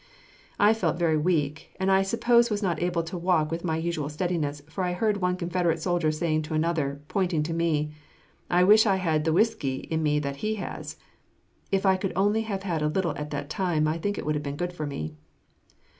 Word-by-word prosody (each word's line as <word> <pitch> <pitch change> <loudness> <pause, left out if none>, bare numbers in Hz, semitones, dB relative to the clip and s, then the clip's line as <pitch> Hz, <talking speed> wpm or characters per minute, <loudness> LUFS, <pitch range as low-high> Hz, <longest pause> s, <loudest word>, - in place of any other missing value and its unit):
I 210 +2 +5
felt 170 -7 0
very 165 -2 +2
weak, 155 -2 -1
and 190 +1 +2
I 190 0 +5
suppose 235 +4 +3
was 210 -1 -1
not 170 -5 0
able 175 -1 0
to 165 +2 -6
walk 170 -3 +1
with 165 +1 -3
my 160 -3 0
usual 160 -3 -2
steadiness, 155 -2 -2
for 170 +4 -4
I 180 0 0
heard 210 +3 +1
one 180 -2 0
Confederate 175 -2 0
soldier 175 -2 +1
say 155 0 0
to 155 +1 -4
another, 155 -3 0
pointing 175 -5 0
to 165 +2 -3
me, 155 -3 0 0.6
"I 180 +1 +4
wish 215 +4 +6
I 195 - +4
had 160 -5 0
the 160 - +2
whiskey 200 - +1 0.2
in 160 0 +1
me 150 -1 +2
that 140 -1 -2
he 215 +7 -1
has." 205 - -6 0.7
If 195 0 +1
I 190 -1 +4 0.2
only 205 +4 +2
could 220 - -6
have 195 -3 -3
had 170 -5 -1
a 150 - +2
little 165 -1 0
at 150 0 -5
that 145 -1 -4
time, 165 -5 +1
I 160 +2 -1
think 205 +4 -2
it - - -4
would 150 - +1
have 150 0 -2
been 140 0 -4
good 175 +2 -3
for 155 -4 -4
me. 80 - -5
170 Hz, 220 wpm, -26 LUFS, 155-190 Hz, 0.7 s, wish